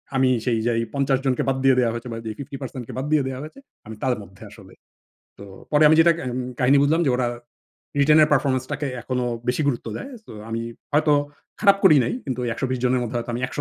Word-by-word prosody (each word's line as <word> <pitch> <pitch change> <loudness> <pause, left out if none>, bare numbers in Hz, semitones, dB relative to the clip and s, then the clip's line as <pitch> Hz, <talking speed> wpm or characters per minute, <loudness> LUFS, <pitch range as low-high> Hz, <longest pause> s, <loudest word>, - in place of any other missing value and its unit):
আমি 130 -1 +3 0.2
সেই 120 -3 +1
যাই 115 -1 +1
৫০ 140 -1 +1
জনকে 130 -2 +1
বাদ 135 - 0
দিয়ে 135 -1 +5
দেয়া 120 -2 +2
হয়েছে। 120 +2 -6
বা 115 - -5
যে 110 - -3
50% 135 -2 -7
কে - - -8
বাদ 130 - -2
দিয়ে 150 -2 +3
দেয়া 130 -1 -5
হয়েছে। 155 - -10 0.3
আমি 110 - -8
তার 130 -1 +2
মধ্যে 95 +1 -14
আসলে। 100 -3 -15 0.6
তো 100 - -11 0.3
পরে 150 0 +4
আমি 155 - +5
যেটা 170 +1 +6
আ - - -6
এম 125 - -2 0.2
কাহিনী 130 +3 +4
বুঝলাম 160 +4 +2
যে - - +2
ওরা 125 -1 0 0.7
রিটেনের 150 +2 +5
পারফরম্যান্স 130 -2 +1
টাকে 145 - -2 0.2
এখনো 125 -1 -2 0.2
বেশি 125 +5 +1
গুরুত্ব 120 -3 -2
দেয়। 275 - -7
সো - - -15 0.2
আমি 115 0 -3 0.3
হয়তো 150 0 +3 0.5
খারাপ 200 -2 +5
করি 165 -6 +8
নাই। - - -2
কিন্তু 130 -3 -4
ওই - - -1
১২০ 130 +1 -2
জনের 125 0 +2
মধ্যে 120 0 -4
হয়তো 120 - -5
আমি 120 - -3
একশো 145 - -5
130 Hz, 230 wpm, -23 LUFS, 120-145 Hz, 0.7 s, করি